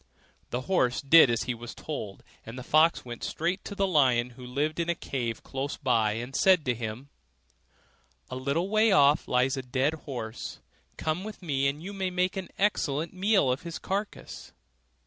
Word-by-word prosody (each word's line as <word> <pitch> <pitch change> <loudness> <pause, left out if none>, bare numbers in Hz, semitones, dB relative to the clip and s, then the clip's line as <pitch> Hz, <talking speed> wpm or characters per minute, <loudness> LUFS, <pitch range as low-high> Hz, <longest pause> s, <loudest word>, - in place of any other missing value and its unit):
The 125 - -2
horse 130 -6 +1
did 140 0 +7
as 115 -1 0
he 125 - -2
was 120 0 -9
told, 105 -11 -6 0.2
and 115 +3 -9
the 130 - -6
fox 155 +3 +3
went 120 -1 -8
straight 175 +4 -2
to 200 - -6
the 195 - +1
lion 130 -8 +3
who 125 +1 -13
lived 145 +6 -2
in 170 0 -1
a 170 - +1
cave 120 -7 -4
close 135 +1 -4
by, 115 -6 +2
and 120 +5 -6
said 185 -2 +4
to 125 - +2
him, 115 +3 -6 1.2
'A - - -3
little 140 +7 -1
way 215 +1 +3
off 145 -3 +4
lies 130 +2 +2
a - - -2
dead 130 +4 0
horse; 125 -7 -6 0.4
come 160 +4 -2
with 215 -2 -8
me 140 -4 +1
and 145 +3 -3
you 200 +3 -6
may 190 -2 -2
make 180 0 0
an 190 -2 -5
excellent 165 -6 0
meal 190 -7 +3
of 130 - -2
his 170 -1 -6
carcase. 200 +2 -5
140 Hz, 185 wpm, -28 LUFS, 125-180 Hz, 1.2 s, did